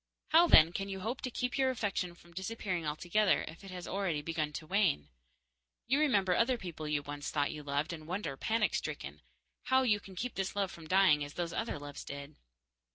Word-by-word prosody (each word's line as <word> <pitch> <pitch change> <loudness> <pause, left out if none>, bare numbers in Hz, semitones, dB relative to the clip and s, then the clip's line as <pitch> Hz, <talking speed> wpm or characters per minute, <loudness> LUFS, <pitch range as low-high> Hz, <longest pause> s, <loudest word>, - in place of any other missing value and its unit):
How, 335 +2 +7
then, 160 - +7
can 195 +1 -3
you 190 -1 -5
hope 235 +7 -3
to 255 - -2
keep 250 +2 -2
your 265 -1 +4
affection 200 -7 -2
from 170 0 -19
disappearing 190 -3 -3
altogether 175 +7 +2
if 160 +5 -10
it 195 - -9
has 180 -1 -7
already 185 -7 -1
begun 155 -2 -1
to 155 - -5
wane? 160 - +1 0.8
You 270 +4 +2
remember 200 -12 +3
other 245 +4 +3
people 170 -7 -6
you 150 -1 0
once 145 0 -5
thought 145 -1 0
you 150 - -6
loved, 145 +4 -1
and 155 -2 -8
wonder, 175 -6 -3
panic 220 +8 +1
stricken, - - -4 0.4
how 260 0 +4
you 210 -5 +3
can 195 -2 -13
keep 245 +7 -3
this 195 0 -2
love 195 -2 0
from 165 -2 -11
dying 185 -5 +5
as 145 0 -8
those 170 -1 -2
other 225 -4 -2
loves 145 0 -8
did. 140 +1 -8
180 Hz, 210 wpm, -33 LUFS, 155-210 Hz, 0.8 s, How